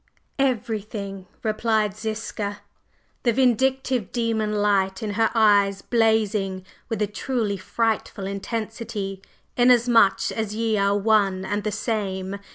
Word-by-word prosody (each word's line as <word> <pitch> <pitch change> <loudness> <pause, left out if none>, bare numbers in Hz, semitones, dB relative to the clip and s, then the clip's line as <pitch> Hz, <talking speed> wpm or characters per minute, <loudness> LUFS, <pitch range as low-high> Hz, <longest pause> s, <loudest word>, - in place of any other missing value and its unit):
"Everything!" 215 -6 -2 0.2
replied 215 -1 +1
Ziska, 215 -1 -4 0.6
the 240 - +2
vindictive 260 -1 +1
demon 225 -3 0
light 200 -1 +1
in 210 - -2
her 225 +2 +2
eyes 200 -3 +4
blazing 215 -5 +1 0.2
with 220 -3 -1
a - - +3
truly 210 +1 -2
frightful 215 0 -2
intensity. 205 0 -4 0.4
"Inasmuch 240 -4 +4
as 220 -2 -3
ye 225 -1 0
are 200 0 +2
one 200 -3 +2
and 205 +1 -2
the 215 - -1
same! 200 -2 -2
215 Hz, 115 wpm, -24 LUFS, 200-225 Hz, 0.6 s, eyes